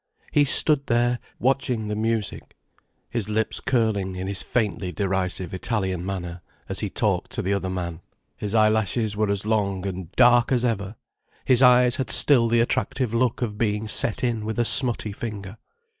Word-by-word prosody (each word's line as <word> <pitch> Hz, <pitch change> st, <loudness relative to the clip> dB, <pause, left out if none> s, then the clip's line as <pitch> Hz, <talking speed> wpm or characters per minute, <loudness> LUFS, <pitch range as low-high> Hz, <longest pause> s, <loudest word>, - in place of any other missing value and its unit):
He 145 Hz, -, +3 dB
stood 140 Hz, 0 st, +5 dB
there, 120 Hz, 0 st, +1 dB, 0.2 s
watching 125 Hz, -4 st, -1 dB
the 105 Hz, -, -3 dB
music, 110 Hz, -1 st, -3 dB, 0.6 s
his 110 Hz, -4 st, -2 dB
lips 110 Hz, +1 st, -1 dB
curling 110 Hz, -7 st, -1 dB
in 90 Hz, +1 st, -5 dB
his 100 Hz, 0 st, +1 dB
faintly 105 Hz, -6 st, -2 dB
derisive 95 Hz, 0 st, -2 dB
Italian 95 Hz, -3 st, -3 dB
manner, 90 Hz, -2 st, -6 dB, 0.3 s
as -, -, -5 dB
he -, -, -3 dB
talked -, -, -1 dB
to -, -, -3 dB
the 100 Hz, -, 0 dB
other 95 Hz, -1 st, -2 dB
man. 90 Hz, -2 st, -5 dB, 0.3 s
His 105 Hz, +1 st, -4 dB
eyelashes 110 Hz, 0 st, +1 dB
were 105 Hz, 0 st, 0 dB
as 100 Hz, 0 st, -2 dB
long 100 Hz, -3 st, -1 dB
and 95 Hz, -3 st, -6 dB
dark 120 Hz, 0 st, +4 dB
as 125 Hz, -1 st, +1 dB
ever, 105 Hz, -3 st, -2 dB, 0.5 s
his 130 Hz, -1 st, +3 dB
eyes 125 Hz, -1 st, +5 dB
had 130 Hz, -, -3 dB
still 125 Hz, -5 st, +5 dB
the 115 Hz, 0 st, +2 dB
attractive 130 Hz, 0 st, -1 dB
look 120 Hz, +1 st, 0 dB
of 105 Hz, -3 st, -5 dB
being 105 Hz, -1 st, -1 dB
set 105 Hz, +2 st, +1 dB
in 115 Hz, -3 st, -1 dB
with 110 Hz, 0 st, -4 dB
a 120 Hz, -, +1 dB
smutty 120 Hz, -4 st, +2 dB
finger. 100 Hz, -1 st, -7 dB
110 Hz, 175 wpm, -23 LUFS, 100-120 Hz, 0.6 s, stood